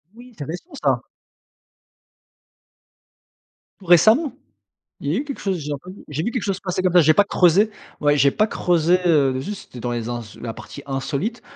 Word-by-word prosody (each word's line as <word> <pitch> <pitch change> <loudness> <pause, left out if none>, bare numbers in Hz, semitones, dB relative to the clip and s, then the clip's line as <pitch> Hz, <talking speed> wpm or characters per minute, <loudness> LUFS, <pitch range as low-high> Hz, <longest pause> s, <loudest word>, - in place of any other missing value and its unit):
Oui! 245 0 -14
C'est 145 - -5
récent 180 - -8
ça? - - +2 2.8
Tout 190 - -15
récemment? 220 - +5 0.7
Il 145 +2 -2
y - - +1
a - - +1
eu - - -4
quelque 280 -2 -7
chose, 190 -3 -1
j'ai 150 -1 -5
revu 185 +2 -11
j'ai 150 +2 -3
vu 235 - -1
quelque 250 -4 -3
chose 195 -2 -1
passer 185 0 -2
comme 185 -2 +2
ça, 175 - +8
j'ai 155 +1 +5
pas 205 - +5
creusé. 195 +3 +3 0.3
Ouais, 145 0 +3
j'ai 140 -1 +4
pas 215 - +2
creusé, 175 -2 +2
heu, 140 -6 +3
juste 195 -5 -8
dans 120 +1 -3
les 120 -1 -3
ins 120 -1 -3 0.2
la 115 -2 -5
partie 140 - -10
insolite, 140 - -3
175 Hz, 185 wpm, -22 LUFS, 145-205 Hz, 2.8 s, ça